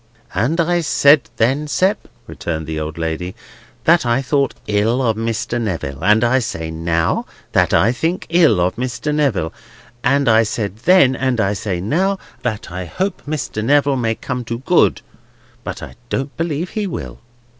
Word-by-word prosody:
"And 125 - 0
I 175 +1 +2
said 145 -1 +4
then, 135 +7 +1
Sept," 190 +7 +1 0.2
returned 80 -2 -4
the 80 0 -4
old 80 +1 -5
lady, 85 +2 -3 0.5
"that 170 +1 +4
I 120 +1 +2
thought 140 0 +1
ill 105 +4 +1
of 115 -4 +1
Mr. 115 +1 -2
Neville. 80 -9 -4
And 105 +4 +4
I 125 +2 +3
say 80 -9 -4
now, 80 0 0 0.2
that - - +2
I 115 - +4
think 165 +8 -2
ill 165 - +4
of 90 +3 0
Mr. 130 +4 -2
Neville. 125 - 0 0.5
And 140 +2 +2
I 110 -1 +6
said 105 -2 -2
then, 180 -8 +6
and 130 -3 0
I 100 -1 +2
say 95 -2 -3
now, 185 - 0 0.2
that 110 -7 -3
I 90 0 -5
hope 190 - -3
Mr. 145 -8 -3
Neville 140 +2 +3
may 115 -3 0
come 125 0 -4
to 115 +1 -3
good, 175 - +3 0.6
but - - -6
I - - -8 0.2
don't 135 +1 -3
believe 165 +1 -2
he 210 -2 -2
will." 175 - -6
120 Hz, 170 wpm, -19 LUFS, 100-145 Hz, 0.6 s, I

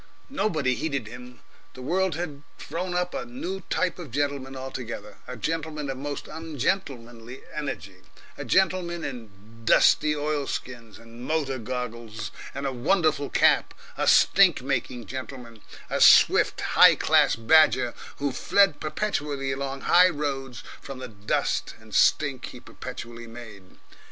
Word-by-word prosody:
Nobody 160 - 0
heeded 140 -3 -3
him. 125 +1 -11 0.3
The 130 - -9
world 180 +3 0
had 150 -4 -5 0.2
thrown 175 +4 -4
up 180 0 -1
a - - -3
new 240 -6 -5
type 185 0 0
of 170 -5 -8
gentleman 140 0 -2
altogether 120 -6 -7
a 125 - -7
gentleman 155 +1 -3
of 130 - -6
most 145 +1 -5
ungentlemanly 135 -6 -4
energy, 100 - -5 0.4
a - - -6
gentleman 175 -2 +1
in 120 -5 -6 0.3
dusty 150 +6 +4
oilskins 135 -7 -4
and 115 +1 -13
motor 135 -3 -1
goggles 115 -2 -5 0.2
and 140 +1 -4
a 135 - 0
wonderful 155 +2 +1
cap, - - +3 0.2
a - - -1
stink - - +5
making 120 -3 -2
gentleman, 125 -1 -8 0.3
a - - -2
swift, - - +6
high - - +6
class - - +3
badger, 130 0 +4 0.2
who 140 -1 -1
fled 195 +5 +2
perpetually 150 -5 -2
along 135 0 -4
high 180 +1 +6
roads 135 -5 -4 0.2
from 135 -1 -8
the 130 -1 -7
dust 105 -1 -2
and - - -16
stink - - +2
he - - -10
perpetually 115 0 -9
made. 110 -5 -12
135 Hz, 135 wpm, -25 LUFS, 120-160 Hz, 0.4 s, swift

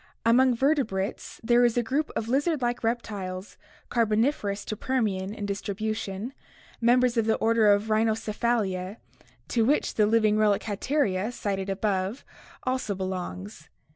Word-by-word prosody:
Among 250 +2 +5
vertebrates 235 -8 -1
there 240 +1 +4
is 240 -1 +2
a 240 - +3
group 280 +7 -1
of 220 - -2
lizard 290 +5 +1
like 240 0 -1
reptiles, 205 -5 -3 0.3
Car 235 - +2
boniferous 215 -2 0
to 215 - -3
Permian 205 -6 -1
in 210 -1 -5
distribution, 205 +2 -3 0.5
members 245 +1 +3
of 225 -1 +2
the 220 - +3
order 225 -1 +3
Rhyn 215 +2 +1
chocephalia 215 -3 -1 0.5
to 230 - +2
which 280 +6 +1
the 210 -1 +3
living 215 -1 +3
relic 210 -1 +3
Hatteria, 215 -2 0
cited 195 -4 -3
above, 195 +3 -1 0.4
also 255 -5 -1
belongs. 185 -2 -5
220 Hz, 140 wpm, -27 LUFS, 200-240 Hz, 0.5 s, Among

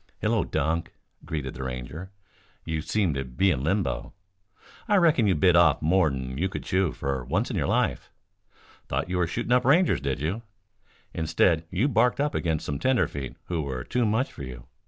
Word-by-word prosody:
"Hullo, - - +2
Dunk," 80 +3 -1 0.3
greeted 75 -5 -4
the 65 - -8
Ranger. 65 +8 -6 0.6
"You 80 -1 -2
seem 95 0 0
to 70 0 -2
be 65 +10 +1
in 65 -5 -1
limbo. 80 -7 -1 0.7
I 210 - +3
reckon 160 - +4
you 95 - +3
bit 85 +3 +4
off 85 -4 +5
more'n 70 -6 +1
you 95 +3 +1
could - - -6
chew, 95 -3 +1
for 65 -2 -3
once 90 - -1
in - - -3
your 75 -7 0
life. - - 0 0.8
Thought 80 - -2
you 90 - 0
were 85 - +2
shooting 120 +7 -3
up 125 0 +4
Rangers, 165 +8 +4
did 70 -1 -2
you? 85 +10 -2 0.7
Instead 80 +1 +2
you 100 +10 +1
barked 125 -1 +2
up 145 +1 +1
against 80 -3 -1
some 70 -2 -3
tenderfeet 95 - 0
who 85 -3 -2
were 65 -4 -4
too 125 - 0
much 110 +5 0
for - - -10
you. 65 -3 -8
85 Hz, 185 wpm, -26 LUFS, 70-105 Hz, 0.8 s, off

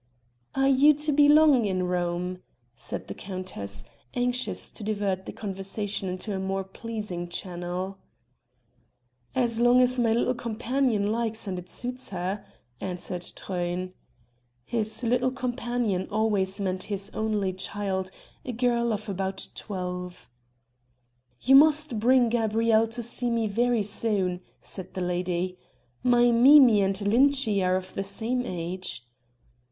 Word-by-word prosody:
"Are 270 0 +3
you 280 +3 +6
to 300 +1 -1
be 290 0 +5
long 295 -6 +6
in 185 -2 0
Rome?" 180 0 -2 0.3
said 115 - -6
the - - -5
countess, 185 - -6 0.3
anxious 245 +1 -1
to 220 - -9
divert 200 -3 -2
the - - -4
conversation 195 0 -4
into 185 +3 -4
a - - -2
more 195 0 -2
pleasing 190 -3 -6
channel. 180 +2 -4 1.4
"As 235 -3 +2
long 245 +1 +5
as 255 0 +3
my 230 -2 +3
little 235 +2 +2
companion 240 -1 0
likes 225 -1 -1
and 185 -2 -3
it 180 0 -12
suits 250 +1 -4
her," 190 +2 -3 0.4
answered 180 -1 -4
Truyn. 180 0 -3 0.7
His 220 - -2
'little 250 +2 +2
companion' 240 -6 -2
always 205 -2 +1
meant 185 -2 -2
his 200 0 -3
only 210 -3 -1
child, 190 0 -2 0.3
a 250 - -4
girl 235 0 +1
of 215 +1 -5
about 190 -1 -3
twelve. 180 - -6 1.1
"You 265 - +4
must 300 -4 +5
bring 245 +2 +4
Gabrielle 225 -1 +2
to 235 +2 -5
see 240 +1 -2
me 230 -1 +1
very 230 +2 +1
soon," 200 -4 -1 0.2
said 185 -1 -7
the 185 - -2
lady. 180 0 -2 0.4
"My 240 -1 +4
Mimi 245 -2 +7
and 195 0 +1
Lintschi 225 -1 +3
are 185 0 +2
of 185 0 -4
the 195 - -2
same 225 +6 -2
age." 180 - -4
210 Hz, 135 wpm, -27 LUFS, 185-240 Hz, 1.4 s, Mimi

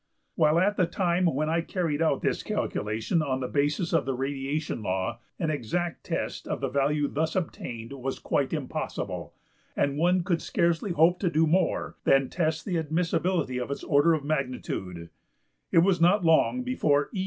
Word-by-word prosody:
While 155 0 +3
at 205 +4 +2
the 180 - +3
time 180 0 +1
when 155 0 0
I 165 +1 +1
carried 165 -3 -2
out 155 -4 +1
this - - 0
calculation 110 - -1
on 135 -3 -1
the 125 - -2
basis 150 +6 0
of 160 -5 +2
the 135 - 0
radiation 135 +1 -3
law 95 +3 -2 0.2
an 160 -3 -1
exact 160 +6 -2
test - - -3
of - - -2
the - - -2
value 145 +2 +1
thus 160 +3 -2
obtained 120 -9 -4
was 135 0 -4
quite - - -1
impossible, - - -4 0.4
and 140 0 +1
one 180 +2 +3
could 170 -2 0
scarcely 170 +3 0
hope 165 +3 +4
to 185 - +1
do 160 -1 +3
more 180 +4 0
than 135 -1 +3
test 160 -3 -1
the 180 -6 0
admissibility 165 -3 0
of 125 - -4
its 140 - -4
order 145 +3 +4
of 145 -3 -5
magnitude, 125 - -3 0.6
it - - +2
was 185 -3 +2
not 180 +2 +4
long 165 +10 +3
before 150 - +1
E. 195 - -3
155 Hz, 175 wpm, -27 LUFS, 135-175 Hz, 0.6 s, hope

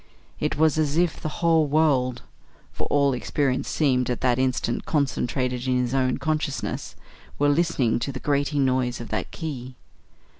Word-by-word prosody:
It - - -1
was 155 +1 +3
as 150 0 +1
if 175 -1 +1
the 155 - -2 0.2
whole 160 -2 +4
world 135 -5 +2 0.5
for - - -4
all 140 -1 +3
experience 130 +1 -1
seemed 130 -5 +1
at 125 - -2
that 125 -1 +2
instant 130 -2 0
concentrated 125 -3 -1
in 130 -1 +2
his 125 0 -1
own 130 -2 +1
consciousness 155 -3 -2 0.4
were 145 0 +3
listening 145 -7 +2
to 140 - -3
the 130 - -6
grating 145 0 +1
noise 130 -1 0
of 120 - -7
that - - -2
key. 130 -6 -6
135 Hz, 160 wpm, -24 LUFS, 125-150 Hz, 0.5 s, whole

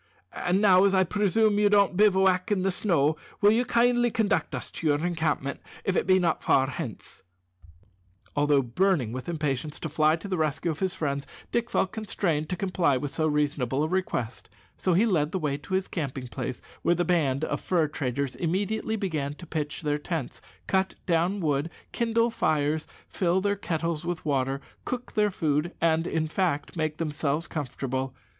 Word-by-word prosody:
And 180 +2 0
now, 190 -3 +6
as 195 -1 +3
I 190 - +5
presume 210 +2 +2
you 210 0 +4
don't 200 -2 +4
bivouac 190 -1 +3
in 190 -3 +2
the 195 - +2
snow, 160 -6 +1 0.2
will 205 0 +6
you 230 +3 +3
kindly 240 0 +3
conduct 220 -2 0
us - - -6
to 165 - -3
your 150 +2 +2
encampment, 160 -5 -1 0.2
if 195 - 0
it - - +1
be 185 0 +6
not 170 -3 +1
far 135 - +4
hence?" 130 -4 -7 1.1
Although 145 -1 +3
burning 135 - +1
with 130 +5 -5
impatience 150 -2 -2
to 160 - -4
fly 155 +1 +3
to 170 +4 -8
the 185 -3 -2
rescue 155 +2 0
of 155 - -6
his 190 -1 -1
friends, 140 -5 -2 0.2
Dick 235 0 0
felt 185 - +1
constrained 175 -8 -1
to 180 - -1
comply 175 -7 +1
with 140 +2 -4
so 155 -1 0
reasonable 145 -3 0
a - - +1
request, 160 -10 -2 0.3
so 185 - 0
he 195 +7 +4
led 160 -8 +1
the - - -1
way 150 -5 -1
to 145 +6 -4
his 190 0 0
camping 135 -6 -4
place, 125 0 -5 0.2
where 175 - +3
the 175 +1 0
band 155 -5 +1
of - - -3
fur 170 -4 +1
traders 140 -2 -2
immediately 200 +6 -1
began 155 -9 -2
to 175 - -11
pitch 150 0 -3
their 150 0 0
tents, 155 -4 -4 0.2
cut 190 0 +1
down 175 +3 +1
wood, 150 0 0 0.2
kindle 230 0 +1
fires, 155 -5 0 0.2
fill 180 0 +1
their 200 +1 +1
kettles 165 -4 -2
with 175 -1 -4
water, 135 -1 0 0.2
cook 250 0 -5
their 210 -1 +3
food, 155 -2 0
and, 165 0 +2
in 160 -1 0
fact, 155 -3 -1
make 155 -2 -1
themselves 150 0 -1
comfortable. 130 -2 -3
165 Hz, 185 wpm, -27 LUFS, 145-190 Hz, 1.1 s, now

